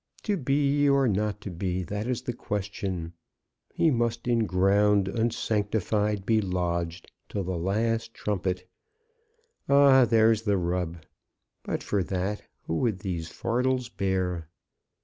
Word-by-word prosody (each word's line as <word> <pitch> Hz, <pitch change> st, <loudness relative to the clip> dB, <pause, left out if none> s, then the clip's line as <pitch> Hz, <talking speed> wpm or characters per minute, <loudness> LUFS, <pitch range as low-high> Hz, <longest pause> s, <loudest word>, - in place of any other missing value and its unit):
'To 210 Hz, -, +1 dB
be 145 Hz, -1 st, +2 dB
or 140 Hz, -1 st, +4 dB
not 105 Hz, 0 st, 0 dB
to 100 Hz, -1 st, -7 dB
be; 90 Hz, +1 st, -2 dB
that 105 Hz, +6 st, -4 dB
is 125 Hz, -2 st, -2 dB
the 125 Hz, -, -3 dB
question.' 95 Hz, -6 st, -4 dB, 0.6 s
He 160 Hz, -, +2 dB
must 115 Hz, -1 st, -1 dB
in 115 Hz, -3 st, +2 dB
ground 100 Hz, +2 st, +3 dB
unsanctified 105 Hz, -2 st, 0 dB
be 110 Hz, 0 st, +3 dB
lodged, 85 Hz, -2 st, -2 dB, 0.2 s
till 100 Hz, -, -2 dB
the 95 Hz, 0 st, -3 dB
last 110 Hz, +6 st, 0 dB
trumpet! 95 Hz, -3 st, -2 dB, 1.0 s
Ah, 140 Hz, -2 st, +7 dB
there's 110 Hz, -1 st, +4 dB
the 105 Hz, -3 st, +1 dB
rub! 85 Hz, -2 st, -2 dB, 0.6 s
But -, -, -3 dB
for 100 Hz, -, 0 dB
that, 95 Hz, +3 st, -2 dB, 0.2 s
who 80 Hz, -, -2 dB
would 115 Hz, -6 st, +1 dB
these 90 Hz, -5 st, -4 dB
fardels 125 Hz, +4 st, -1 dB
bear?" 90 Hz, -6 st, -2 dB
105 Hz, 130 wpm, -27 LUFS, 90-115 Hz, 1.0 s, Ah